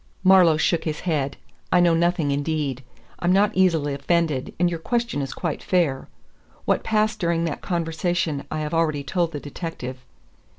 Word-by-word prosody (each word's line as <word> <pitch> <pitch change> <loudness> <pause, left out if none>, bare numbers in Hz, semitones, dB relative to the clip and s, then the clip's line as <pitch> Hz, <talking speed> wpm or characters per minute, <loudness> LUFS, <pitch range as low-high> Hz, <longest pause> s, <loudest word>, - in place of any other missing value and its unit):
Marlowe 185 -4 +6
shook 165 +1 +1
his 155 -2 -3
head. 145 -5 -1 0.3
"I 180 - +5
know 175 -1 +5
nothing, 165 -3 +1
indeed. 145 -2 -2 0.4
I'm 175 - +1
not 200 +3 +4
easily 165 -6 +2
offended, 150 -1 0
and 175 - +4
your 170 -1 -2
question 235 -4 -1
is 135 - -4
quite 170 -4 -3
fair. 165 -8 0 0.6
What - - +1
passed 215 0 +1
during 170 -2 +1
that 165 - -3
conversation 165 -3 -1
I 155 - -3
have 150 +1 -4
already 155 -3 +1
told 170 +3 -1
the 150 - -5
detective. 140 -4 -6
165 Hz, 165 wpm, -23 LUFS, 145-175 Hz, 0.6 s, Marlowe